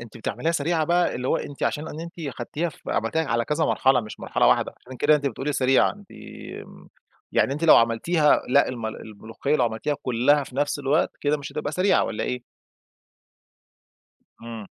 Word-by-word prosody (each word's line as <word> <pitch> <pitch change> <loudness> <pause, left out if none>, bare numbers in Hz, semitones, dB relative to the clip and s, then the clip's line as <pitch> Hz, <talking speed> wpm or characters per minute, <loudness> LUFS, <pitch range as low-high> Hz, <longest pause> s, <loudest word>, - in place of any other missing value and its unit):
أنتِ 120 -1 -11
بتعمليها 120 +7 -2
سريعة 160 +1 0
بقى، 175 +2 +2
اللي 125 +1 -3
هو - - +2
أنتِ 140 - -7
عشان 155 +2 -1
إن 155 - -7
أنتِ 170 0 -7
أخدتيها 150 +3 -4
ف 150 - -13
عملتيها 160 +9 0
على 115 -3 0
كذا 150 +5 0
مرحلة 130 -1 +3
مش 105 -2 -10
مرحلة - - +1
واحدة، - - +3
عشان 130 +1 -11
كده 150 +4 +4
أنتِ 145 -1 -4
بتقولي 140 +3 -2
سريعة 135 -1 +3
أنتِ 205 -1 -17 1.2
يعني - - +2
أنتِ 150 +4 -3
لو 160 - +8
عملتيها 150 +7 +3
لأ، 140 +3 +4
الم 120 -3 -4
الملوخية 110 +6 -4
لو 125 - +2
عملتيها 120 +6 -2
كلها 130 +4 +2
في 130 - -13
نفس 145 +1 0
الوقت، 145 +3 +1
كده 145 +1 +1
مش 145 - -8
هتبقى 145 - -3
سريعة، 185 +4 +3
والّا 110 - -3
إيه؟ 125 -1 -3 2.0
إمم. 115 -3 -8
140 Hz, 180 wpm, -24 LUFS, 120-155 Hz, 2.0 s, لو